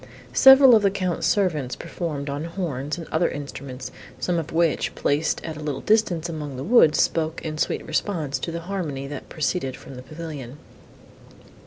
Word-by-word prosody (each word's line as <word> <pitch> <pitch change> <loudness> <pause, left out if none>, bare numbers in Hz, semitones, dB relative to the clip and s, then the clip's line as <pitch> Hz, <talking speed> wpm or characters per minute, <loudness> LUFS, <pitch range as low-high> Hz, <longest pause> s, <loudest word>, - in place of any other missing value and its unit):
Several 265 -1 +8
of 220 - +6
the 200 - +4
Count's 185 -4 -1
servants 155 -11 +1
performed 150 -5 -5
on 145 +3 -3
horns 160 -5 -3
and 165 - -7
other 160 +2 +1
instruments, 140 -2 -7 0.3
some 175 +3 0
of 165 0 -6
which, 165 -1 +1
placed 150 +3 0
at 160 -2 -5
a - - -8
little 145 -3 -4
distance 190 -7 +2
among 150 -5 -6
the 130 - -4
woods, 180 - +5
spoke, 160 0 +1
in 155 -1 -4
sweet - - -1
response, 155 -9 -2
to 165 - -4
the 170 0 -4
harmony, 165 -7 -4
that 140 0 -8
proceeded 150 -4 -2
from - - -12
the 125 - -8
pavilion. 145 -2 -8
160 Hz, 175 wpm, -24 LUFS, 140-175 Hz, 0.3 s, Several